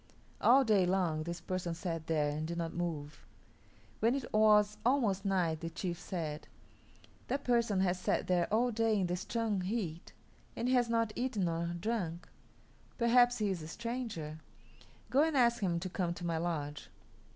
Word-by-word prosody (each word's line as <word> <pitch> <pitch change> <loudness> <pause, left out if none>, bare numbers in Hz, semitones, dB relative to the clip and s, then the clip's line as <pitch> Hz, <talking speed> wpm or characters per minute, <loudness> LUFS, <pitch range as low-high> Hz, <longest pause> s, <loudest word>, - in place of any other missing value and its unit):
All 265 +3 +6
day 210 -5 +4
long 180 -4 +1
this 170 +2 -4
person 180 -2 -3
sat 165 -2 -4
there 150 -2 +1
and 155 +1 -3
did 170 +1 -4
not 165 -1 -3
move. 155 -4 -4 0.8
When 230 +4 +3
it 270 -3 -5
was 210 -1 +5
almost 225 -7 +2
night 175 -5 +1
the 165 - -4
chief 170 +1 -4
said, 155 -5 -5 0.8
"That 280 +1 -2
person 235 -5 +2
has 180 -1 +1
sat - - 0
there 180 -1 +1
all 240 +3 +2
day 225 -1 +1
in 190 - +1
the 175 0 -1
strong 215 +1 -1
heat, 180 -4 -3 0.4
and 235 - -2
he 255 - +2
has 245 -2 +3
not 230 -2 +1
eaten 240 -6 -1
nor 170 0 -1
drunk. 180 -5 -3 0.7
Perhaps 245 0 +4
he 210 -2 0
is 180 -3 -3
a 155 - -7
stranger. 225 -8 -5 0.7
Go 270 +3 +5
and 315 -2 +2
ask 235 -2 +3
him 175 -4 +1
to 185 - -4
come 175 -2 -2
to 175 - -6
my 165 -1 0
lodge." 150 -4 -3
190 Hz, 175 wpm, -33 LUFS, 170-230 Hz, 0.8 s, All